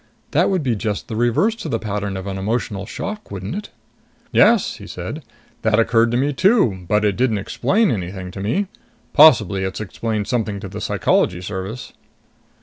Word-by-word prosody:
That - - +3
would 185 -5 0
be 125 -4 +1
just 105 -1 -3
the 110 - -4
reverse 120 - +2
to 165 - -6
the 115 - 0
pattern 100 -3 -3
of 95 - -6
an 95 -1 -4
emotional 100 -1 -2
shock, 210 - -6
wouldn't 95 - -5
it?" 205 +2 -5 0.6
"Yes," - - +4
he - - -10
said. - - -6 0.4
"That 110 -1 +2
occurred 115 0 +3
to 120 - 0
me 140 +3 +1
too, 130 - +2
but 105 +2 +2
it 100 -2 +2
didn't 120 -2 +1
explain 205 - +1
anything 95 -2 -4
to 95 - -8
me. 150 - 0 0.5
Possibly 110 - +6
it's 95 0 -3
explained 110 +1 -3
something 110 -5 -1
to 100 - -7
the 105 +3 -7
Psychology 90 -3 +1
Service." 95 +5 -6
110 Hz, 180 wpm, -20 LUFS, 100-125 Hz, 0.6 s, Possibly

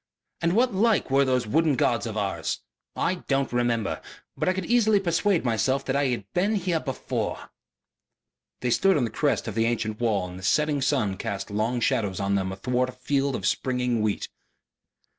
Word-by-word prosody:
And 170 +1 +2
what 245 +2 +3
like 210 -6 +2
were 135 +1 +5
those 130 -2 +1
wooden 150 +6 +2
gods 120 -1 +1
of 110 -1 -5
ours? 100 -2 -2 0.3
I 180 +1 -1
don't 135 -3 0
remember.... 120 -3 0 0.3
But - - 0
I - - +2
could 190 -1 -3
easily 220 -3 +4
persuade 175 -2 +1
myself 125 +4 +1
that 135 - -1
I 140 0 +2
had 120 -6 -2
been 200 +5 +1
here 180 -4 0
before." 135 -4 -4 1.1
They 125 - 0
stood 195 +6 +4
on 135 - +1
the 115 - -2
crest 145 +3 0
of 110 - -3
the 115 +1 +1
ancient 110 -2 -1
wall 110 -6 +1
and 90 +1 -9
the - - -12
setting 150 +6 +2
sun 120 -9 +1
cast 100 -2 -4
long 110 +4 0
shadows 100 -5 0
of 100 0 0
them 95 -1 0
athwart 125 +6 -1
a - - -8
field 135 +1 0
of 95 - -4
springing 125 0 0
wheat. 105 -2 -1
125 Hz, 190 wpm, -26 LUFS, 110-160 Hz, 1.1 s, were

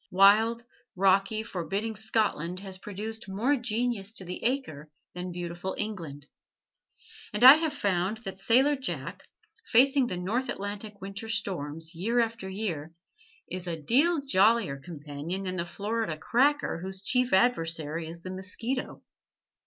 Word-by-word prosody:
Wild, 215 +5 +5 0.3
rocky, 195 +3 +3
forbidding 200 +4 -3
Scotland 210 -5 -1
has 190 -2 -7
produced 210 +2 -6
more 230 +9 +1
genius 235 -4 -1
to 190 - -6
the 180 +1 -6
acre 230 - -2 0.2
than 180 0 -5
beautiful 175 +1 -5
England: 165 -10 -5 1.1
and - - -1
I 265 +4 +12
have 320 -1 0
found 200 -5 0
that 190 0 -6
sailor 260 +8 +4
Jack, 260 -1 -5 0.5
facing 265 +2 +5
the 180 - -3
North 220 +9 -1
Atlantic 205 +1 -5
winter 200 +3 -6
storms, 165 -7 -3
year 220 +9 0
after 225 -4 -1
year, 170 -6 -4 0.5
is 180 0 -5
a 165 -2 -3
deal 285 - +3
jollier 220 - +3
companion 155 +4 -6
than 185 -1 -3
the 170 - -1
Florida 205 -2 -2
cracker 270 - +2
whose 190 +2 -6
chief 250 +3 +2
adversary 165 -7 +1
is 170 +1 -9
the 185 - -5
mosquito. 215 +7 -4
195 Hz, 135 wpm, -28 LUFS, 175-230 Hz, 1.1 s, I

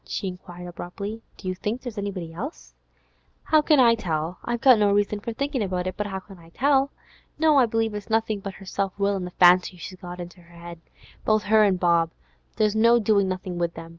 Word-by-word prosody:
he 195 - -3
inquired 180 -1 -8
abruptly. 200 +5 -7 0.2
'Do 190 - -9
you 185 - 0
think 210 +6 -4
there's 245 -4 -6
any 200 0 -2
one 180 -4 -6
else?' 255 - -7 0.7
'How 310 -1 +4
can 300 -1 +4
I 235 -2 +6
tell? 170 -5 -3
I've 240 0 -2
got 255 -5 +6
no 205 -1 +3
reason 205 +1 +1
for 230 - -5
thinkin' 275 +2 -2
it, 200 - -1
but 185 +3 -3
how 190 -1 -4
can 195 -2 -15
I 165 0 -16
tell? 275 +7 +2 0.5
No, 310 -2 +4
I 250 - +4
believe 225 -1 0
it's 210 +1 -7
nothin' 220 -1 0
but 195 -1 -7
her 195 - -12
self 195 0 -3
will 200 0 +1
an' 185 -2 -3
the - - -5
fancies 180 0 +4
she's 185 +2 -8
got 180 0 -8
into 175 +1 -9
her 170 0 -12
'ead. 170 - -11 0.4
Both 215 -1 +2
her 215 +1 +4
an' 200 -3 +3
Bob, 170 -2 +2 0.5
there's 215 -1 +1
no 230 +2 +5
doin' 205 -3 +2
nothin' 185 -1 -4
with 170 -1 -1
them. 165 0 -9
200 Hz, 225 wpm, -24 LUFS, 180-225 Hz, 0.7 s, I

